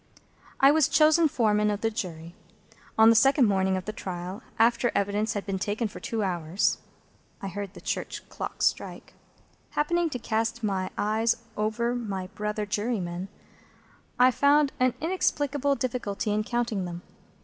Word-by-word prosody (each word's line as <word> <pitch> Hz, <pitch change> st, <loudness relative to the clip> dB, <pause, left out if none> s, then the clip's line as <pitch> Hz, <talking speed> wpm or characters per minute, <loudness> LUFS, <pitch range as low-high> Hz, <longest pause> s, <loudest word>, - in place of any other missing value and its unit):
I 275 Hz, +1 st, +7 dB
was 310 Hz, -2 st, +4 dB
chosen 315 Hz, +1 st, +5 dB
Foreman 210 Hz, -6 st, +2 dB
of 205 Hz, 0 st, -2 dB
the 225 Hz, -, +1 dB
Jury. 170 Hz, -5 st, -6 dB, 0.6 s
On 220 Hz, +1 st, +8 dB
the -, -, +4 dB
second 270 Hz, +3 st, +5 dB
morning 190 Hz, -2 st, +2 dB
of 185 Hz, -, -5 dB
the 215 Hz, -, -4 dB
trial, 185 Hz, +1 st, -6 dB, 0.2 s
after 235 Hz, +1 st, +3 dB
evidence 205 Hz, +2 st, 0 dB
had 205 Hz, -, -4 dB
been 195 Hz, -2 st, -2 dB
taken 210 Hz, +4 st, -1 dB
for -, -, -10 dB
two 225 Hz, -2 st, -2 dB
hours 175 Hz, -1 st, 0 dB, 0.6 s
(I 195 Hz, -, -5 dB
heard 200 Hz, +1 st, -6 dB
the -, -, -11 dB
church -, -, -4 dB
clocks -, -, -3 dB
strike), -, -, -2 dB, 0.6 s
happening 340 Hz, +3 st, +1 dB
to 255 Hz, -, -4 dB
cast 225 Hz, 0 st, -2 dB
my 190 Hz, -3 st, -1 dB
eyes 220 Hz, +2 st, +1 dB, 0.2 s
over 220 Hz, +3 st, 0 dB
my 200 Hz, -6 st, -3 dB
brother 210 Hz, 0 st, -3 dB
jurymen, 200 Hz, -4 st, -2 dB, 0.9 s
I 250 Hz, +1 st, +6 dB
found 285 Hz, +2 st, +3 dB
an 255 Hz, -1 st, +2 dB
inexplicable 290 Hz, -5 st, 0 dB
difficulty 235 Hz, -5 st, -2 dB
in 215 Hz, 0 st, 0 dB
counting 230 Hz, -6 st, -1 dB
them. 175 Hz, 0 st, -7 dB
215 Hz, 155 wpm, -27 LUFS, 195-250 Hz, 0.9 s, On